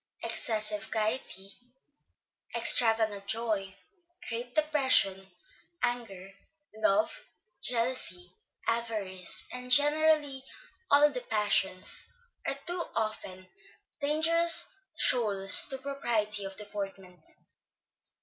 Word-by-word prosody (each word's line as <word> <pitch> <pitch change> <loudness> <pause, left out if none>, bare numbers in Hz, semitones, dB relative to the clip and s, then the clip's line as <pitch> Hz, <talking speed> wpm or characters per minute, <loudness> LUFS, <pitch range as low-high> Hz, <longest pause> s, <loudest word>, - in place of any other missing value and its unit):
Excessive 215 -1 -3
gaiety, 215 -3 -2 1.0
extravagant 220 -4 +4
joy, 210 -4 -2 0.5
great 240 +1 -6
depression, 265 -11 +2 0.6
anger, 210 -6 -4 0.4
love, 215 -1 -1 0.3
jealousy, 230 -7 0 0.3
avarice, 215 -6 -2
and 250 0 -8
generally 295 0 +4 0.5
all 290 +1 +5
the 250 -3 -6
passions, 205 -4 -1 0.4
are 275 - -2
too 350 0 -2
often 195 -4 -5 0.5
dangerous 325 +3 +1 0.3
shoals 205 -6 +5
to 270 - -3
propriety 235 -7 -2
of 195 0 -9
deportment. 195 -4 -9
225 Hz, 80 wpm, -28 LUFS, 195-265 Hz, 1.0 s, all